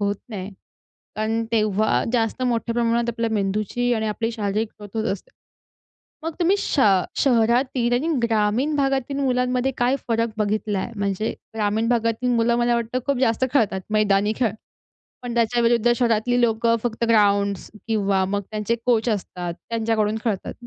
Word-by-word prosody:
होत 200 Hz, 0 st, 0 dB
नाही. 200 Hz, -3 st, -6 dB, 0.7 s
कारण 220 Hz, +1 st, -1 dB
तेव्हा 215 Hz, -1 st, +2 dB
जास्त 230 Hz, +1 st, 0 dB
मोठ्या 235 Hz, -1 st, 0 dB
प्रमाणात 235 Hz, 0 st, +1 dB
आपल्या 230 Hz, -1 st, -1 dB
मेंदूची 215 Hz, +4 st, 0 dB
आणि 220 Hz, -1 st, -1 dB
आपली 225 Hz, +2 st, -2 dB
शारीरिक 215 Hz, 0 st, -1 dB
ग्रोथ 205 Hz, +1 st, -10 dB
होत -, -, -4 dB
असते. 195 Hz, -, -8 dB, 0.9 s
मग 325 Hz, +1 st, -3 dB
तुम्ही 360 Hz, +3 st, +3 dB
श 290 Hz, -, 0 dB, 0.4 s
शहरातील 240 Hz, 0 st, +2 dB
आणि 270 Hz, +7 st, 0 dB
ग्रामीण 230 Hz, +6 st, +1 dB
भागातील 275 Hz, -1 st, 0 dB
मुलांमध्ये 250 Hz, -1 st, +1 dB
काय 245 Hz, +2 st, +2 dB
फरक 230 Hz, 0 st, +1 dB
बघितलाय? 210 Hz, 0 st, -1 dB
म्हणजे 200 Hz, +1 st, -1 dB, 0.2 s
ग्रामीण 215 Hz, +1 st, 0 dB
भागातील 230 Hz, 0 st, 0 dB
मुलं 235 Hz, +1 st, +2 dB
मला 240 Hz, 0 st, +2 dB
वाटतं 235 Hz, +2 st, -1 dB
खूप 280 Hz, -3 st, +1 dB
जास्त 235 Hz, -1 st, +2 dB
खेळतात 215 Hz, -8 st, +2 dB
मैदानी 210 Hz, -1 st, +2 dB
खेळ. 230 Hz, -6 st, +1 dB, 0.7 s
पण 245 Hz, -1 st, -5 dB
त्याच्याविरुद्ध 235 Hz, 0 st, +3 dB
शहरातली 240 Hz, 0 st, +1 dB
लोकं 230 Hz, 0 st, +2 dB
फक्त 235 Hz, -1 st, -2 dB
ग्राउंड्स 200 Hz, -3 st, +2 dB, 0.2 s
किंवा 200 Hz, -3 st, +1 dB
मग 200 Hz, +1 st, -1 dB
त्यांचे 215 Hz, +2 st, -1 dB
कोच 235 Hz, -1 st, +2 dB
असतात 180 Hz, -4 st, -3 dB, 0.2 s
त्यांच्याकडून 220 Hz, -2 st, 0 dB
खेळतात. 210 Hz, -5 st, -2 dB
230 Hz, 145 wpm, -23 LUFS, 210-245 Hz, 0.9 s, तुम्ही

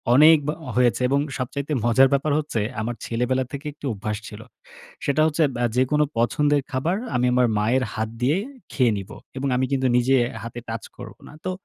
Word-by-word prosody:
অনেক 155 Hz, +3 st, +8 dB
ব -, -, 0 dB, 0.3 s
হয়েছে, 125 Hz, 0 st, +2 dB
এবং 140 Hz, +1 st, +2 dB, 0.2 s
সবচাইতে 140 Hz, +3 st, -4 dB
মজার 130 Hz, +3 st, +5 dB
ব্যাপার 140 Hz, +2 st, +1 dB
হচ্ছে, 145 Hz, -8 st, -2 dB, 0.2 s
আমার 120 Hz, +2 st, -3 dB
ছেলেবেলা 125 Hz, +3 st, 0 dB
থেকে 140 Hz, +1 st, -7 dB
একটি 145 Hz, -, -11 dB
অভ্যাস 105 Hz, +1 st, -4 dB
ছিল। 105 Hz, 0 st, -9 dB, 0.6 s
সেটা 140 Hz, +2 st, +2 dB
হচ্ছে 160 Hz, +1 st, +1 dB
বআ 120 Hz, 0 st, 0 dB
যেকোনো 150 Hz, +4 st, +3 dB
পছন্দের 145 Hz, +4 st, +2 dB
খাবার 155 Hz, +8 st, 0 dB, 0.2 s
আমি 125 Hz, 0 st, +2 dB
আমার 125 Hz, -1 st, +4 dB
মায়ের 125 Hz, +5 st, +2 dB
হাত 110 Hz, 0 st, -2 dB
দিয়ে 145 Hz, +8 st, +2 dB, 0.3 s
খেয়ে 125 Hz, -4 st, +2 dB
নিবো, 95 Hz, -, -8 dB, 0.2 s
এবং 140 Hz, +1 st, -1 dB
আমি 130 Hz, +1 st, +1 dB
কিন্তু 130 Hz, -1 st, +1 dB
নিজে 130 Hz, +2 st, +3 dB, 0.3 s
হাতে 115 Hz, +1 st, -7 dB
টাচ 115 Hz, 0 st, -4 dB
করবো -, -, -10 dB
না। -, -, -13 dB
তো 185 Hz, -, 0 dB
130 Hz, 185 wpm, -23 LUFS, 120-145 Hz, 0.6 s, অনেক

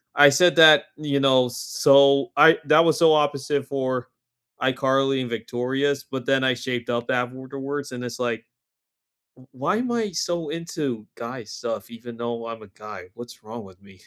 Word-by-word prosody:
I 145 Hz, 0 st, +8 dB
said 175 Hz, +5 st, +3 dB
that, 155 Hz, -2 st, +8 dB
you 145 Hz, -2 st, -2 dB
know, 130 Hz, -2 st, +3 dB
so 140 Hz, +2 st, +3 dB
I 160 Hz, -, +7 dB
that 155 Hz, +2 st, +5 dB
was 160 Hz, -, +2 dB
so 160 Hz, -2 st, +5 dB
opposite 145 Hz, -1 st, 0 dB
for 130 Hz, -2 st, -3 dB, 0.6 s
iCarly 135 Hz, 0 st, +1 dB
and 125 Hz, -, -5 dB
Victorious, 135 Hz, +4 st, -2 dB
but 130 Hz, -2 st, -5 dB
then 135 Hz, 0 st, +1 dB
I 130 Hz, -1 st, +2 dB
shaped 120 Hz, -1 st, -5 dB
up 120 Hz, 0 st, -3 dB
afterwards, 130 Hz, +3 st, -4 dB
and 125 Hz, 0 st, -7 dB
it's 120 Hz, 0 st, -7 dB
like 115 Hz, -2 st, -3 dB, 0.9 s
"W 130 Hz, 0 st, -20 dB
why 140 Hz, +10 st, -1 dB
am 250 Hz, +2 st, -3 dB
I 225 Hz, -3 st, -2 dB
so 170 Hz, -2 st, -3 dB
into 150 Hz, -, -5 dB
guy 115 Hz, -1 st, -8 dB
stuff 115 Hz, +1 st, -6 dB
even 115 Hz, 0 st, -11 dB
though 120 Hz, -1 st, -5 dB
I'm 115 Hz, -1 st, -8 dB
a 105 Hz, -, -14 dB
guy? 105 Hz, -2 st, -11 dB
What's 120 Hz, 0 st, -12 dB
wrong 110 Hz, +1 st, -9 dB
with 95 Hz, 0 st, -17 dB
me?" 95 Hz, -2 st, -20 dB
130 Hz, 175 wpm, -23 LUFS, 120-145 Hz, 0.9 s, I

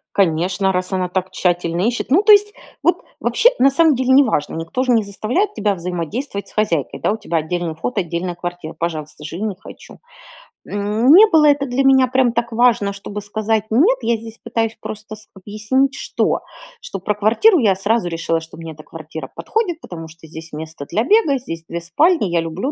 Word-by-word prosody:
Конечно, 190 Hz, +2 st, +1 dB
раз 185 Hz, 0 st, -2 dB
она 185 Hz, -1 st, 0 dB
так 185 Hz, +1 st, -3 dB
тщательно 175 Hz, -2 st, 0 dB
ищет. 240 Hz, -, -3 dB
Ну, 355 Hz, +8 st, +5 dB
то 425 Hz, -, +3 dB
есть, 415 Hz, 0 st, +6 dB, 0.3 s
вот -, -, +2 dB, 0.2 s
вообще 485 Hz, -, +3 dB
на 270 Hz, -, +6 dB
самом 300 Hz, +1 st, +3 dB
деле 260 Hz, +1 st, -1 dB
неважно, 260 Hz, -, +3 dB
никто 165 Hz, +11 st, -3 dB
же 255 Hz, -, +2 dB
не 225 Hz, -2 st, +3 dB
заставляет 245 Hz, -, -2 dB
тебя 205 Hz, -1 st, 0 dB
взаимодействовать 180 Hz, -, -4 dB
с -, -, -15 dB
хозяйкой, 170 Hz, -, -1 dB
да, -, -, +1 dB
у -, -, -2 dB
тебя 190 Hz, -6 st, -2 dB
отдельный 165 Hz, +1 st, -3 dB
вход, 210 Hz, +8 st, -4 dB
отдельная 175 Hz, 0 st, -3 dB
квартира, 175 Hz, -2 st, -6 dB
пожалуйста, 155 Hz, -3 st, -5 dB
живи- 165 Hz, +6 st, -6 dB
не 210 Hz, -3 st, -2 dB
хочу. -, -, -13 dB, 0.7 s
Не 225 Hz, -, +4 dB
было 315 Hz, -4 st, +5 dB
это 285 Hz, -1 st, +3 dB
для 260 Hz, +1 st, 0 dB
меня 265 Hz, -1 st, +5 dB
прям 255 Hz, -1 st, +2 dB
так 235 Hz, 0 st, -2 dB
важно, 225 Hz, -4 st, +2 dB
чтобы 200 Hz, +1 st, -7 dB
сказать: 215 Hz, +1 st, -1 dB
"Нет". 335 Hz, -, +3 dB
Я 235 Hz, -, +1 dB
здесь 225 Hz, 0 st, -10 dB
пытаюсь 225 Hz, -1 st, -2 dB
просто 215 Hz, 0 st, -8 dB
с 215 Hz, -, -16 dB
объяснить 215 Hz, +8 st, -1 dB
что? -, -, -1 dB, 0.4 s
Что 195 Hz, -, -7 dB
про 210 Hz, +3 st, -1 dB
квартиру 235 Hz, -, +4 dB
я 205 Hz, -7 st, +3 dB
сразу 205 Hz, +1 st, 0 dB
решила, 165 Hz, -1 st, -1 dB
что 160 Hz, 0 st, -13 dB
мне 165 Hz, 0 st, -8 dB
эта 155 Hz, 0 st, -13 dB
квартира 160 Hz, 0 st, -9 dB
подходит, 360 Hz, -7 st, -2 dB
потому 165 Hz, -2 st, -8 dB
что 160 Hz, +1 st, -16 dB
здесь 160 Hz, 0 st, -11 dB
место 155 Hz, -1 st, -7 dB
для 220 Hz, -, 0 dB
бега, 310 Hz, -, +3 dB
здесь 165 Hz, -10 st, -7 dB
2 170 Hz, 0 st, -5 dB
спальни, 300 Hz, -, +2 dB
я 170 Hz, 0 st, +1 dB
люблю 165 Hz, -, -3 dB
205 Hz, 195 wpm, -19 LUFS, 170-255 Hz, 0.7 s, есть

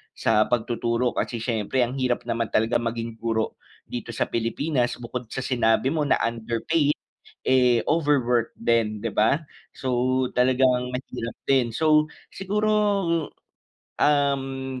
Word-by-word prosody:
sa 110 Hz, 0 st, +2 dB
pagtuturo. 120 Hz, +1 st, 0 dB
Kasi 115 Hz, -2 st, -3 dB
siyempre 120 Hz, +2 st, 0 dB
ang 130 Hz, +3 st, -3 dB
hirap 125 Hz, -1 st, 0 dB
naman 115 Hz, -1 st, -1 dB
talaga 115 Hz, +2 st, +1 dB
maging 115 Hz, -1 st, -4 dB
guro 115 Hz, -1 st, -2 dB, 0.2 s
dito -, -, -6 dB
sa -, -, +1 dB
Pilipinas, 120 Hz, +3 st, 0 dB
bukod 120 Hz, 0 st, -6 dB
sa 130 Hz, +3 st, -5 dB
sinabi 120 Hz, +1 st, +2 dB
mo 150 Hz, -2 st, 0 dB
na -, -, +4 dB
underpaid, 120 Hz, +7 st, 0 dB, 0.5 s
eh, 125 Hz, -2 st, +4 dB
overwork 130 Hz, -7 st, +2 dB
din, 110 Hz, -2 st, +1 dB
'di 110 Hz, -1 st, -4 dB
ba? 110 Hz, +7 st, +3 dB, 0.3 s
So, 130 Hz, 0 st, 0 dB
talagang 125 Hz, 0 st, +3 dB
mahirap 125 Hz, -2 st, -5 dB
din. 130 Hz, -4 st, +3 dB
So, 155 Hz, +4 st, +3 dB, 0.2 s
siguro, 210 Hz, +3 st, -1 dB, 1.3 s
hmm, 135 Hz, -2 st, +1 dB
125 Hz, 125 wpm, -24 LUFS, 115-135 Hz, 1.3 s, na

